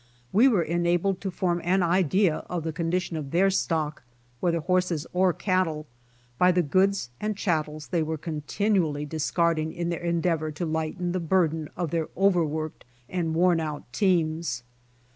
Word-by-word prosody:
We 225 Hz, +7 st, +6 dB
were 210 Hz, -10 st, +3 dB
enabled 175 Hz, +3 st, 0 dB
to 195 Hz, -, -2 dB
form 175 Hz, -1 st, -1 dB
an 185 Hz, +2 st, +2 dB
idea 180 Hz, 0 st, +2 dB
of 175 Hz, -3 st, -2 dB
the 160 Hz, -1 st, -3 dB
condition 170 Hz, +1 st, -1 dB
of 145 Hz, -3 st, -5 dB
their 190 Hz, +5 st, +3 dB
stock, 155 Hz, -5 st, -1 dB, 0.4 s
whether 170 Hz, +1 st, +1 dB
horses 180 Hz, -2 st, 0 dB
or 185 Hz, 0 st, +3 dB
cattle, 175 Hz, -5 st, 0 dB, 0.5 s
by 180 Hz, 0 st, +6 dB
the 180 Hz, 0 st, +2 dB
goods 185 Hz, -2 st, +1 dB
and 215 Hz, -1 st, -2 dB
chattels 155 Hz, -6 st, -2 dB
they 170 Hz, -3 st, +1 dB
were 160 Hz, 0 st, -2 dB
continually 155 Hz, 0 st, -1 dB
discarding 160 Hz, +1 st, 0 dB
in 170 Hz, 0 st, -3 dB
their 170 Hz, -, -2 dB
endeavor 170 Hz, -2 st, 0 dB
to 170 Hz, +4 st, -3 dB
lighten 160 Hz, +3 st, -2 dB
the 185 Hz, -, -1 dB
burden 160 Hz, -3 st, +1 dB
of 170 Hz, -4 st, -2 dB
their 165 Hz, -2 st, -1 dB
overworked 160 Hz, -5 st, +1 dB, 0.3 s
and 165 Hz, -3 st, -1 dB
worn 175 Hz, 0 st, +4 dB
out 155 Hz, -2 st, -4 dB
teams. 165 Hz, -, +1 dB
170 Hz, 160 wpm, -26 LUFS, 155-185 Hz, 0.5 s, We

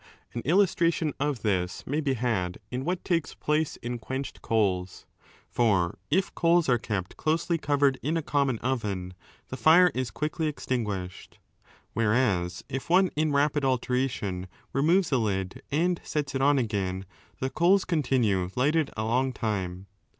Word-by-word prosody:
An 120 Hz, -, -3 dB
illustration 170 Hz, -2 st, +2 dB
of 140 Hz, -5 st, -1 dB
this 95 Hz, -4 st, -1 dB
may 150 Hz, +4 st, -1 dB
be 135 Hz, -3 st, 0 dB
had 105 Hz, -7 st, -1 dB
in 125 Hz, +1 st, -3 dB
what 180 Hz, +4 st, -2 dB
takes 165 Hz, -5 st, 0 dB
place 150 Hz, 0 st, 0 dB
in 120 Hz, 0 st, -3 dB
quenched 130 Hz, +4 st, -5 dB
coals. 95 Hz, -5 st, 0 dB, 0.4 s
For 95 Hz, -9 st, +1 dB
if 190 Hz, +6 st, +1 dB
coals 170 Hz, 0 st, +3 dB
are 125 Hz, -2 st, +3 dB
kept 100 Hz, -5 st, -4 dB
closely 165 Hz, +2 st, 0 dB
covered 140 Hz, -2 st, +2 dB
in 155 Hz, +4 st, 0 dB
a 165 Hz, -, -2 dB
common 140 Hz, -5 st, +1 dB
oven, 100 Hz, -8 st, -2 dB, 0.4 s
the 130 Hz, -, -5 dB
fire 175 Hz, +4 st, +6 dB
is 130 Hz, -2 st, -2 dB
quickly 150 Hz, -, -2 dB
extinguished. 105 Hz, -10 st, -4 dB, 0.6 s
Whereas 105 Hz, -6 st, +1 dB
if 135 Hz, +5 st, -5 dB
one 185 Hz, +2 st, +5 dB
in 155 Hz, 0 st, +1 dB
rapid 145 Hz, 0 st, +2 dB
alternation 125 Hz, -8 st, -1 dB, 0.3 s
removes 165 Hz, +6 st, +3 dB
a 130 Hz, -, +3 dB
lid 95 Hz, -4 st, -2 dB
and 170 Hz, +4 st, +1 dB
6 -, -, -15 dB
sets 145 Hz, -3 st, -2 dB
it 135 Hz, -, -1 dB
on 145 Hz, +1 st, +4 dB
again, 100 Hz, -6 st, -1 dB, 0.3 s
the 130 Hz, 0 st, -2 dB
coals 180 Hz, +4 st, +3 dB
continue 120 Hz, -, +1 dB
lighted 150 Hz, +4 st, +2 dB
a 110 Hz, -, -1 dB
long 130 Hz, +4 st, +1 dB
time. 95 Hz, -6 st, -3 dB
130 Hz, 155 wpm, -27 LUFS, 105-155 Hz, 0.6 s, fire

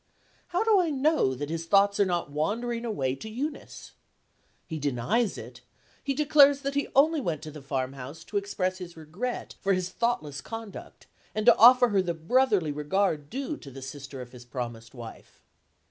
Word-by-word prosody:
How 360 Hz, +4 st, 0 dB
do 440 Hz, -3 st, +4 dB
I 350 Hz, -3 st, +2 dB
know 290 Hz, -, +2 dB
that 145 Hz, +4 st, -5 dB
his 165 Hz, 0 st, -4 dB
thoughts 200 Hz, +2 st, +4 dB
are 200 Hz, -, +5 dB
not 175 Hz, -5 st, -2 dB
wandering 230 Hz, +10 st, -2 dB
away 135 Hz, -, -1 dB
to 180 Hz, +11 st, -8 dB
Eunice? 280 Hz, +7 st, -6 dB, 0.7 s
He 160 Hz, -, -5 dB
denies 145 Hz, -, 0 dB
it; -, -, -10 dB, 0.4 s
he 275 Hz, -1 st, -1 dB
declares 285 Hz, -1 st, +5 dB
that 275 Hz, 0 st, -2 dB
he 285 Hz, 0 st, 0 dB
only 305 Hz, +3 st, +4 dB
went 160 Hz, -, -3 dB
to 155 Hz, -, -7 dB
the 150 Hz, 0 st, -10 dB
farmhouse 135 Hz, +2 st, -5 dB
to 205 Hz, -, -4 dB
express 195 Hz, -2 st, -2 dB
his 175 Hz, -2 st, -9 dB
regret 180 Hz, +11 st, -5 dB
for 195 Hz, -1 st, +2 dB
his 185 Hz, -1 st, -2 dB
own -, -, -28 dB
thoughtless 150 Hz, -, -1 dB
conduct, 225 Hz, +1 st, -9 dB, 0.3 s
and 215 Hz, 0 st, -1 dB
to 240 Hz, -, +8 dB
offer 245 Hz, +2 st, +7 dB
her 200 Hz, -3 st, +3 dB
the 175 Hz, -2 st, -2 dB
brotherly 195 Hz, -, +2 dB
regard 150 Hz, 0 st, 0 dB
due 275 Hz, +4 st, -4 dB
to 140 Hz, -, -11 dB
the 135 Hz, 0 st, -10 dB
sister 135 Hz, -1 st, -8 dB
of 125 Hz, -1 st, -10 dB
his 125 Hz, -1 st, -12 dB
promised 120 Hz, -1 st, -6 dB
wife. 115 Hz, -2 st, -11 dB
185 Hz, 185 wpm, -27 LUFS, -, 0.7 s, to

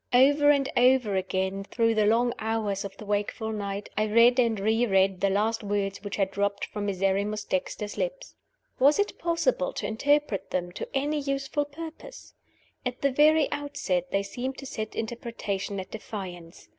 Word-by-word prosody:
Over 285 Hz, +4 st, +6 dB
and 280 Hz, -2 st, +4 dB
over 250 Hz, -4 st, +4 dB
again, 190 Hz, +1 st, -1 dB
through 230 Hz, +2 st, +1 dB
the 215 Hz, -1 st, +3 dB
long 235 Hz, +2 st, +3 dB
hours 215 Hz, -3 st, -1 dB
of 195 Hz, -1 st, -8 dB
the 215 Hz, -, -9 dB
wakeful 210 Hz, +2 st, -2 dB
night, 200 Hz, -1 st, -4 dB
I 215 Hz, -, +2 dB
read 235 Hz, +4 st, +5 dB
and 230 Hz, -4 st, +2 dB
re 220 Hz, +4 st, +2 dB
read 190 Hz, -2 st, +2 dB
the 200 Hz, -, +3 dB
last 215 Hz, +3 st, 0 dB
words 200 Hz, -1 st, -2 dB
which 205 Hz, 0 st, -4 dB
had 195 Hz, -2 st, 0 dB
dropped 200 Hz, 0 st, -1 dB
from 205 Hz, -1 st, -4 dB
Miserrimus 200 Hz, +2 st, 0 dB
Dexter's 205 Hz, +2 st, -3 dB
lips. -, -, -3 dB, 0.5 s
Was 285 Hz, +3 st, +5 dB
it 410 Hz, 0 st, -1 dB
possible 330 Hz, -, +1 dB
to -, -, -4 dB
interpret 220 Hz, -2 st, +1 dB
them 175 Hz, -1 st, -2 dB
to -, -, -6 dB
any 295 Hz, +2 st, 0 dB
useful 275 Hz, +1 st, -1 dB
purpose? 320 Hz, +10 st, -10 dB, 0.5 s
At 250 Hz, +1 st, -4 dB
the 280 Hz, -, +3 dB
very 305 Hz, +2 st, +5 dB
outset 275 Hz, -12 st, -2 dB
they 195 Hz, +1 st, 0 dB
seemed 250 Hz, +6 st, -5 dB
to 275 Hz, -, -8 dB
set 220 Hz, -4 st, -5 dB
interpretation 220 Hz, -4 st, -4 dB
at 185 Hz, 0 st, -7 dB
defiance. 185 Hz, -6 st, -8 dB
220 Hz, 170 wpm, -27 LUFS, 195-270 Hz, 0.5 s, Over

